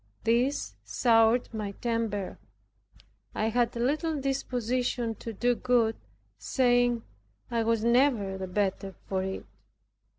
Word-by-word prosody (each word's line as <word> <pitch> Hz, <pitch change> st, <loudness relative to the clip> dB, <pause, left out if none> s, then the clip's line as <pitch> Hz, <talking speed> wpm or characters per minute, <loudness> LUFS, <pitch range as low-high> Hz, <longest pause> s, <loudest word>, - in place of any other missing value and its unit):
This 245 Hz, +5 st, +1 dB
soured 230 Hz, 0 st, +3 dB
my 210 Hz, -2 st, -4 dB
temper. 225 Hz, -4 st, -2 dB, 1.0 s
I 220 Hz, -, +1 dB
had 240 Hz, +1 st, +1 dB
little 295 Hz, +6 st, 0 dB
disposition 250 Hz, -3 st, -1 dB
to 230 Hz, -, -5 dB
do 240 Hz, +3 st, +1 dB
good, 235 Hz, -2 st, +2 dB, 0.4 s
saying, 245 Hz, -, +2 dB, 0.5 s
"I 230 Hz, -1 st, +1 dB
was 225 Hz, -1 st, +1 dB
never 235 Hz, -5 st, +3 dB
the 190 Hz, 0 st, -5 dB
better 195 Hz, 0 st, -1 dB
for 190 Hz, -1 st, -1 dB
it." 190 Hz, 0 st, -4 dB
230 Hz, 110 wpm, -28 LUFS, 215-245 Hz, 1.0 s, soured